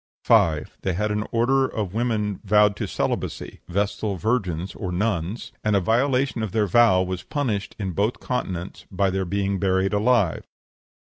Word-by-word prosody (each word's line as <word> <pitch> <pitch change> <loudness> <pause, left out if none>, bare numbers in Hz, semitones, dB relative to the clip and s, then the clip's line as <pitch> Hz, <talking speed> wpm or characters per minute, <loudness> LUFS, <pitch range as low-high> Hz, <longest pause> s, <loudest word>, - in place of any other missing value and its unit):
5. 80 -2 +2
They 95 - -1
had 105 +4 -1
an 105 +1 -1
order 130 +3 +2
of 100 -7 -4
women 110 -4 -1
vowed 105 0 +4
to - - -3
celibacy - - -3
vestal 100 +2 -1
virgins 95 -4 -1
nuns; 95 +4 -2
and 105 -1 +2
a - - +5
violation 125 +5 +1
of 110 -4 -3
their 110 -2 +2
vow 100 -2 +4
was 95 -1 -4
punished, 115 -9 -2
in 95 -3 -3
both 105 +7 -1
continents, 95 -8 -4
by 95 0 +1
their 95 0 -1
being 100 +1 -1
buried 95 +1 +1
alive. 105 -4 +2
100 Hz, 155 wpm, -24 LUFS, 95-115 Hz, -, a